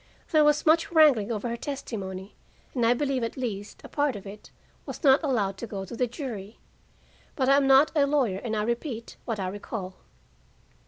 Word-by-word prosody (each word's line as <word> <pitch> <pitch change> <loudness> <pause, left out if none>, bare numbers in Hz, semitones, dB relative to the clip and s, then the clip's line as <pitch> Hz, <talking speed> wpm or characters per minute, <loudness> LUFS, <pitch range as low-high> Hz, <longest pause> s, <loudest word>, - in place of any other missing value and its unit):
There 310 -1 +5
was 295 0 +3
much 325 +2 +3
wrangling 285 -10 +5
over 220 +1 -2
her 235 - -2
testimony, 205 -8 -6 0.4
and 245 - 0
I 240 - +4
believe 270 -2 -1
at 230 - -4
least 210 -5 -5
a - - -8
part 290 -4 0
of 205 - -8
it 200 +1 -10 0.3
was - - -8
not 270 0 +6
allowed 215 - 0
to 235 - -5
go 195 -2 -5
to 190 - -8
the 250 +1 0
jury. 230 -5 -7 0.8
But 265 -2 +1
I 275 - +6
am 280 -1 +3
not 270 +3 +6
a 285 -2 +4
lawyer, 260 -10 +1
and 220 -1 -3
I 210 - 0
repeat 235 +1 -4
what 225 -3 -3
I 190 - -2
recall. 190 -1 -6
235 Hz, 200 wpm, -27 LUFS, 205-280 Hz, 0.8 s, not